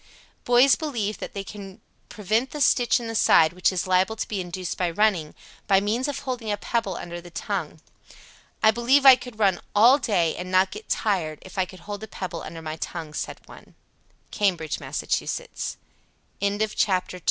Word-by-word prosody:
Boys 245 +3 +6
believe 230 -9 -3
that - - -7
they 200 - -3
can 195 0 -10 0.3
prevent 220 +5 -1
the 300 - -7
stitch 245 -3 +3
in 235 - -6
the 225 - -4
side 165 -6 +5
which 180 +2 +2
is 185 -2 -2
liable 185 +3 +2
to 220 - -4
be 200 -3 -3
induced 180 0 -5
by 180 -2 0
running, 175 -4 +1 0.3
by 195 -1 +5
means 220 +7 -1
of 290 - -3
holding 245 -5 -4
a 205 - -1
pebble 205 -3 -2
under 175 0 -7
the 175 - -12
tongue. 170 -3 -4 0.8
"I 220 - +7
believe 250 +5 +3
I 265 -1 +11
could 250 -3 -11
run 195 -5 +2
all 240 +7 +7
day, 190 - +1
and 180 +1 -6
not 185 +1 +3
get 425 +1 -10
tired, 175 -8 0
if 185 - -12
I 185 - +2
could 185 -1 -14
hold 205 +3 -7
a 220 - -7
pebble 180 -4 -6
under 165 0 -8
my 155 0 -5
tongue," 160 -2 -6
said - - -5
one. - - -15 0.6
Cambridge, 175 -7 0
Mass. - - -4
CHAPTER - - +1
III. - - -13
PHYSICAL - - -4 1.0
CHARACTERISTICS. 185 -2 0
200 Hz, 195 wpm, -24 LUFS, 180-230 Hz, 1.0 s, I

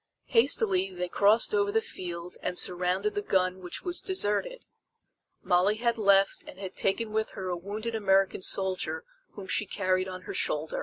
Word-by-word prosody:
Hastily 220 -6 +3
they 180 0 -4
crossed 210 - +3
over 410 -1 +2
the 445 - +3
field 180 - -6
and 180 0 -3
surrounded 180 +3 0
the 205 - -2
gun 185 -2 0
which 180 -1 -6
was 355 0 0
deserted. 375 - -1 0.8
Molly 180 +4 +3
had 235 0 0
left 195 -1 +3
and - - -11
had 190 -1 -7
taken 215 +3 0
with 220 0 -1
her 185 -1 -5
a 180 - -1
wounded 210 +6 -5
American 195 -3 +2
soldier 190 - +1 0.3
whom 200 - -9
she 205 +2 0
carried 185 -1 0
on 185 -1 -7
her - - -6
shoulder. 150 +1 -2
195 Hz, 170 wpm, -28 LUFS, 185-220 Hz, 0.8 s, Hastily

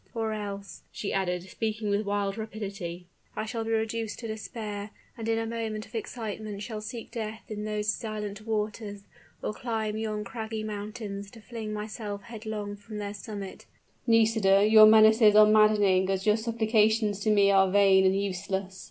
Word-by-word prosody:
Or 220 -1 -1
else," 200 -2 -6
she 205 - -4
added, 180 -2 -1
speaking 215 +2 -3
with 200 +1 0
wild 200 -1 0
rapidity, 200 -5 -6 0.3
"I - - -2
shall 225 0 -3
be 225 - -5
reduced 225 -1 -1
to 230 - -6
despair, 215 -1 -5 0.3
and 225 -2 -4
in 225 - +2
a 225 - -1
moment 225 -1 -4
of - - -20
excitement 215 -2 -5
shall 215 -1 -5
seek 230 +1 -7
death 220 -1 -5
in 210 -1 -4
those 210 0 0
silent 215 -2 -5
waters, 210 -1 -3 0.4
or - - -2
climb 220 -2 -3
yon 215 -1 -2
craggy 220 -1 -5
mountains 205 -1 -6
to 225 - -14
fling 220 -1 -6
myself 210 -1 -5
headlong 215 -3 -5
from 210 +1 -9
their 205 -1 -4
summit." 200 -1 -8 0.4
"Nisida, 220 -3 +4
your 215 0 +9
menaces 220 0 +7
are 215 0 +9
maddening 210 -3 +4
as 190 0 -1
your 210 -1 +5
supplications 220 -2 +2
to 215 - 0
me 200 -1 +5
are 190 -1 +5
vain 195 -1 +5
and 190 +1 +3
useless!" 190 0 -3
215 Hz, 170 wpm, -28 LUFS, 200-220 Hz, 0.4 s, your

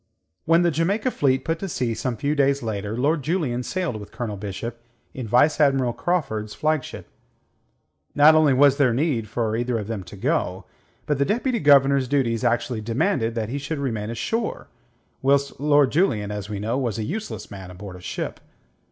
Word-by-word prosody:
When 165 +2 +4
the 170 - +3
Jamaica 195 - 0
fleet 130 - +1
put 165 0 -1
to 195 - -4
sea 125 -7 -1
some 120 +1 -3
few 145 +5 0
days 140 -2 +2
later, 105 0 -3
Lord 145 +5 +1
Julian 145 -6 -1
sailed 175 -3 -3
with 105 -1 -10
Colonel 115 -4 -4
Bishop 105 +4 -6 0.3
in 125 -4 -6
Vice 125 +9 +3
Admiral 135 -4 +3
Craufurd's 110 -13 -2
flagship. 155 -3 -2 1.1
Not 150 +2 +7
only 155 -2 +5
was 140 +1 +5
there 130 -5 +3
no 130 - +1
need 120 -10 -1
for 110 -1 -1
either 120 0 -1
of 105 - -4
them 110 -3 -4
to 85 - -11
go, 100 - -1 0.4
but 150 -2 -1
the - - +4
Deputy 235 - 0
Governor's 140 -4 +5
duties 120 -5 0
actually 120 -1 0
demanded 115 - 0
that 110 -2 -2
he 140 +4 -3
should 145 +3 -4
remain 110 -6 -3
ashore, 220 - -3 0.5
whilst 140 +1 +1
Lord 145 -2 +4
Julian, 110 - +1
as 105 -1 -5
we 105 - -4
know, 110 +6 -1
was 120 -6 -2
a 110 - -2
useless 215 - -5
man 95 -2 -8
aboard 95 +1 -9
a 90 - -11
ship. - - -5
130 Hz, 185 wpm, -23 LUFS, 110-150 Hz, 1.1 s, Not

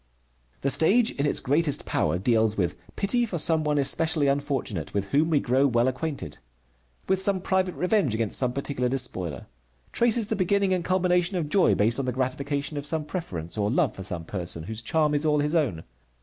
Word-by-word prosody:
The 140 - +1
stage 220 - +3
in 145 +1 -1
its - - 0
greatest 145 +2 +1
power - - 0
deals 110 +2 +1
with 90 -4 0 0.2
pity 240 +5 +1
for 210 -7 -3
some 160 0 +2
one 150 -1 0
especially 155 +2 +2
unfortunate, 140 - -2
with 100 -1 0
whom 155 +3 +3
we 155 -3 +3
grow 130 +3 +2
well 120 -1 +2
acquainted; 135 - -4 0.7
with 190 0 +2
some 195 -1 +1
private 185 0 0
revenge 180 - +1
against 110 -2 +1
some 125 -2 0
particular 130 -1 -2
despoiler; 95 - -2 0.5
traces 235 -1 +2
the 220 +1 -2
beginning 195 0 +1
and 180 -2 -1
culmination 180 0 +1
of 155 -4 -2
joy 190 +3 +4
based 115 +5 +2
on 135 - -1
the 125 - -1
gratification 140 +3 -2
of 145 - -4
some 160 -1 -1
preference, 100 - -5
or 105 0 +1
love 140 -1 +1
for - - -9
some 90 -3 -5
person, 85 -3 -5
whose 110 +5 -6
charm 150 +5 +1
is 145 +1 0
all 150 -1 +2
his 150 +1 0
own. 120 - 0
145 Hz, 195 wpm, -26 LUFS, 120-175 Hz, 0.7 s, joy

